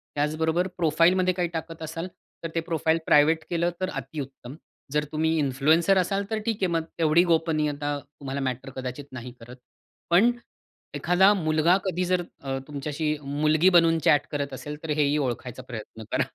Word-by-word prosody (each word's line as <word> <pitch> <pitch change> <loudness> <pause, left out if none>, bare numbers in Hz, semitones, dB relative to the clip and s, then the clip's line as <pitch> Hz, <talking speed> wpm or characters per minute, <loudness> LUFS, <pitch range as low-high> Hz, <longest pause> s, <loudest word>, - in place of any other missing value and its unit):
त्याचबरोबर 160 +4 0
प्रोफाइलमध्ये 175 +3 +3
काही 175 -1 -1
टाकत 165 0 -6
असाल, 165 +2 -5 0.4
तर 165 - -3
ते - - +2
प्रोफाइल 165 -1 0
प्रायव्हेट 155 +2 +4
केलं 170 0 +1
तर 185 - 0
अतिउत्तम. 135 -2 -7 0.4
जर 150 +1 +1
तुम्ही 160 +1 +1
इन्फ्लुएन्सर 155 +7 +3
असाल 195 +2 +1
तर 220 - -1
ठीक 230 -1 +1
आहे, 190 - +3
मग 165 -1 +1 0.2
तेवढी 165 +1 +4
गोपनीयता 155 -4 0
तुम्हाला 140 -1 -7
मॅटर 130 0 -3
कदाचित 130 +2 -5
नाही 125 -1 -7
करत. 120 +2 -11 0.5
पण, 190 +8 +5 0.6
एखादा 190 +3 +4
मुलगा 160 -1 +3
कधी 185 -1 -1
जर 180 0 +1 0.2
अ, 135 -1 -2
तुमच्याशी 150 +1 -2
मुलगी 150 +5 +3
बनून 165 -2 +4
चॅट 145 -2 +4
करत 140 -2 -3
असेल, 150 +3 -6
तर 160 - -6
हेही 150 -1 +2
ओळखायचा 125 -3 -3
प्रयत्न 110 -2 -8
करा. - - +2
155 Hz, 160 wpm, -26 LUFS, 145-170 Hz, 0.6 s, पण